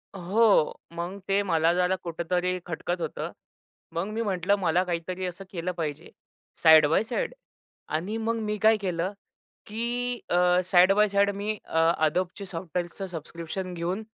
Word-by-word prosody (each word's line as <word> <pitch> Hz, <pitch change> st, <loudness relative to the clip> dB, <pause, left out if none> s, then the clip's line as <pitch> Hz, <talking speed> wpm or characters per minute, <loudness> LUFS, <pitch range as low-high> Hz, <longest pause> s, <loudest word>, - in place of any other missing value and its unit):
हो. 195 Hz, -1 st, +3 dB
मग 175 Hz, +4 st, -5 dB
ते 195 Hz, +1 st, +2 dB
मला 165 Hz, -3 st, +2 dB
जरा 180 Hz, +1 st, +2 dB
कुठेतरी 180 Hz, +2 st, -1 dB
खटकत 175 Hz, +1 st, -3 dB
होतं. 160 Hz, -, -4 dB, 0.6 s
मग 170 Hz, +3 st, -2 dB
मी 225 Hz, -, -1 dB
म्हटलं 195 Hz, -2 st, +1 dB
मला 180 Hz, 0 st, +2 dB
काहीतरी 180 Hz, +1 st, -3 dB
असं 185 Hz, +2 st, -6 dB
केलं 180 Hz, 0 st, -3 dB
पाहिजे 160 Hz, -2 st, -5 dB, 0.5 s
साइड 160 Hz, -2 st, +8 dB
बाय 165 Hz, +8 st, +3 dB
साइड 485 Hz, -, -2 dB, 0.6 s
आणि 195 Hz, +8 st, -2 dB
मग 225 Hz, +1 st, -1 dB
मी 210 Hz, 0 st, -2 dB
काय 220 Hz, 0 st, +5 dB
केलं, 185 Hz, -1 st, -2 dB, 0.5 s
की 240 Hz, +3 st, -2 dB
अ, 180 Hz, 0 st, +4 dB
side 185 Hz, +1 st, +5 dB
by 210 Hz, +1 st, +4 dB
side 200 Hz, 0 st, +3 dB
me 210 Hz, +1 st, -2 dB
a, 160 Hz, -, -2 dB, 0.3 s
Adobeची 185 Hz, +4 st, -3 dB
सॉफ्टवेअरचं 175 Hz, +1 st, -4 dB
subscription 170 Hz, +2 st, -6 dB
घेऊन 180 Hz, +5 st, -3 dB
180 Hz, 150 wpm, -27 LUFS, 170-200 Hz, 0.6 s, साइड